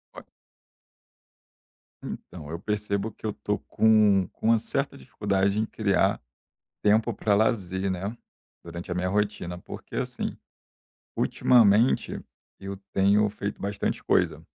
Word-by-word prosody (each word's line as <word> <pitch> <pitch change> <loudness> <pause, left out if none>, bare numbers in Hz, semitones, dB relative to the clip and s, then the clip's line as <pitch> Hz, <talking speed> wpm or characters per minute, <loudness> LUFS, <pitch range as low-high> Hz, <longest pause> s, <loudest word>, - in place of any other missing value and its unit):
Olha - - -10 1.8
Então, 75 -5 -8
eu 85 +1 -5
percebo 105 +1 -2
que - - -13
eu 110 - 0
estou 105 0 -3
com 105 -4 +4
com - - -4
uma 115 -1 +5
certa - - -1
dificuldade 100 +7 0
em 110 - +1
criar 100 -1 +1 0.6
tempo 110 +3 +3
pra 105 0 +1
lazer, 100 -3 +1
né, 95 +5 -3 0.5
durante 85 +1 -8
a - - -1
minha 90 +1 -1
rotina, 100 -3 -1
porque, - - -9
assim, - - -3 0.8
ultimamente 115 0 +3 0.4
eu 100 0 -6 0.2
tenho 100 +2 +4
feito 100 0 -5
bastante 100 0 -2
coisa 80 -3 +1
100 Hz, 125 wpm, -26 LUFS, 95-105 Hz, 1.8 s, uma